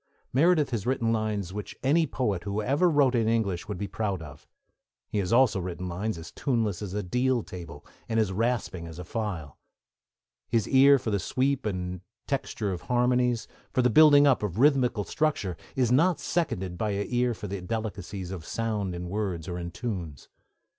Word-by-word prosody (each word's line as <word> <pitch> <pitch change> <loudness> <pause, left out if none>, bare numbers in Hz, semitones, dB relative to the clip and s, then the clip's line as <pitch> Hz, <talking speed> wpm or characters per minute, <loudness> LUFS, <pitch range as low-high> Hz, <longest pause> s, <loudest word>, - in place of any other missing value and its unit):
Meredith 155 +1 +4
has 115 -2 -2
written 115 -3 +1
lines 105 -4 -2
which 105 -1 -6
any 155 +4 +3
poet 105 -10 -1
who 100 +3 -2
ever 140 +11 +2
wrote 145 -5 +3
in 115 -3 +2
English 105 -6 0
would 105 -3 -4
be 100 - -3
proud 100 -1 -2
of; 75 -4 -11 0.6
he 105 - -2
has 95 -2 -1
also 120 -4 +4
written 90 0 -4
lines 90 +3 -3
as 80 - -9
tuneless 115 - -1
as 100 -2 -5
a 105 - -1
deal 125 +5 +1
table 85 -5 -9 0.2
and 115 0 +1
as 105 -4 +1
rasping 105 -5 -1
as 80 -1 -9
a 90 - -6
file. 90 - -4 0.9
His 115 -2 +1
ear 140 +1 +7
for 120 -4 -3
the 100 - +1
sweep 130 +5 0
and 90 -2 -3 0.2
texture 115 -6 -2
of 90 - -5
harmonies, 125 -1 +1 0.2
for 130 -2 +2
the 125 - +3
building 145 +2 +7
up 140 -3 +4
of 105 -3 -3
rhythmical 125 -5 +3
structure, 145 - -1 0.2
is 125 -3 +2
not 165 +7 +4
seconded 95 - -2
by 110 - 0
an 100 +1 -1
ear 120 -1 +1
for 105 - -8
the 100 -1 -4
delicacies 100 -2 -4
of 90 -4 -6
sound 105 -2 -2
in 90 0 -5
words 95 -4 -3
or 90 0 -4
in 85 0 -4
tunes. 85 - -5
110 Hz, 190 wpm, -27 LUFS, 90-125 Hz, 0.9 s, ear